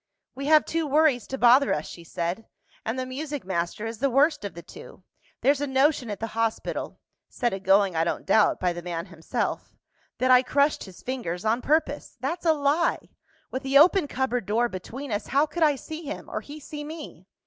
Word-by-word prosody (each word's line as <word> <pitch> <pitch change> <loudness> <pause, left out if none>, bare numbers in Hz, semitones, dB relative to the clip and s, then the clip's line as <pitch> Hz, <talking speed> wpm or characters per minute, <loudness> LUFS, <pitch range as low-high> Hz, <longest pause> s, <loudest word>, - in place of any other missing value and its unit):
"We 275 +2 -5
have 310 0 +6
two 325 -1 -1
worries 285 -5 +3
to 265 - -4
bother 250 +3 +5
us," 150 - -4
she 170 - -10
said; 170 +6 -4 0.4
"and 225 +3 -3
the 255 - -2
music 280 -1 -5
master 180 +3 -2
is 225 -1 -5
the 275 +2 +2
worst 290 +2 +3
of 200 -5 -6
the 170 - -9
two. - - -13 0.4
There's 280 +1 +3
a 290 - -1
notion 265 -2 +2
at 205 - -4
the 225 - -2
hospital 225 0 -2 0.3
(set 240 -3 -1
agoing, 195 -1 +3
I 160 - +2
don't 170 - -2
doubt, 210 +2 +3
by 180 -1 +1
the 175 - -6
man 170 -1 -4
himself), 165 -2 -4 0.4
that 255 0 +2
I 250 0 +8
crushed 285 +3 +1
his 190 -3 -14
fingers 220 -8 -4
on 225 +3 +1
purpose. 295 -2 0
That's 335 +8 -3
a 320 - +6
lie! 295 +3 0 0.4
With 260 - -3
the 270 0 +3
open 345 +2 +6
cupboard 250 -5 -2
door 230 +4 +2
between 235 +8 -7
us, 205 - -2
how 280 +3 +3
could 340 +2 -6
I 300 -2 +5
see 315 +4 -8
him, 295 0 -6
or - - -3
he 295 +1 -10
see 295 0 -7
me? 295 - -9
255 Hz, 205 wpm, -26 LUFS, 205-290 Hz, 0.4 s, I